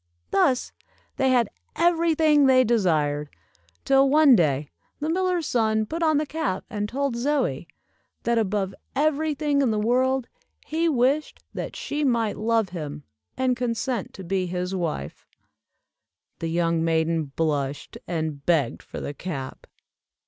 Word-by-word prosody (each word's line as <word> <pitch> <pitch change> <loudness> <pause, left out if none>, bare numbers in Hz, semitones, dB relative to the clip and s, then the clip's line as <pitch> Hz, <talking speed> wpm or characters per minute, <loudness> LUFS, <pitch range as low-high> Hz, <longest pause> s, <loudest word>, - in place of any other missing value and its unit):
Thus, 250 +6 +2 0.5
they 265 -1 +2
had 240 -4 +2 0.2
every 335 -1 +3
thing 300 -3 +4
they 255 -1 +6
desired, 155 - +1 0.6
till 270 0 +4
one 295 -2 +6
day, 150 -6 +1 0.3
the 305 +2 -1
miller's 365 -2 0
son 220 -2 +1
put 330 +9 -5
on 315 -2 +3
the 305 - +1
cap, 300 -10 -3
and 210 -1 -2
told 275 0 -1
Zoie, 245 - -1 0.6
that 235 -1 +2
above 195 -2 -1 0.2
every 305 +1 +1
thing 290 -1 +1
in 265 - +2
the 215 - 0
world, 255 +3 +1 0.4
he 330 +2 0
wished 275 +2 0
that - - -5
she 295 +1 -3
might 235 -6 +1
love 225 -2 +1
him, 150 -4 -6 0.3
and 255 -1 +1
consent 240 -2 -2
to 190 - -8
be 185 +1 -1
his 180 +1 -3
wife. 160 - -4 1.1
The 165 - -3
young 165 -1 +1
maiden 165 -1 +1
blushed, 145 -1 -2
and 155 -4 -3
begged 165 -4 +1
for - - -8
the 145 - -5
cap. 140 -5 -6
230 Hz, 145 wpm, -25 LUFS, 170-280 Hz, 1.1 s, they